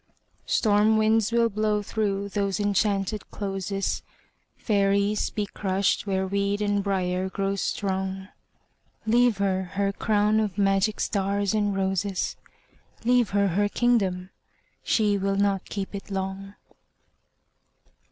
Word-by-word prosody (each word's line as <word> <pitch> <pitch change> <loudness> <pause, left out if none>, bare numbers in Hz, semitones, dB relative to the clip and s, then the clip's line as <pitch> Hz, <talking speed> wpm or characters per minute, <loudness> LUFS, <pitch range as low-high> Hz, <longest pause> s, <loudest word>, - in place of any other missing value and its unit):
Storm 215 0 +3
winds 220 0 +2
will 235 0 +3
blow 210 -1 0
through 200 -2 -1
those 200 0 -1
enchanted 205 0 0
closes, 195 -1 -3 0.6
Fairies 200 0 +1
be 210 - -2
crushed 195 0 -1
where 190 -1 0
weed 200 +1 0
and 205 -1 0
briar 185 -1 -1
grow 195 +1 -1
strong... 190 -1 -2 0.8
Leave 240 0 +3
her 195 -1 +1
her 200 0 0
crown 210 +1 +2
of 210 -3 -2
magic 195 +1 +2
stars 200 0 0
and 205 -2 +1
roses, 195 0 -1 0.7
Leave 245 -1 +3
her 200 0 +2
her 205 +4 +1
kingdom—she 205 -1 -1
will 195 0 0
not 200 -1 +1
keep 200 -1 -4
it 200 +1 -7
long! 195 +1 -4
200 Hz, 115 wpm, -26 LUFS, 195-210 Hz, 0.8 s, Storm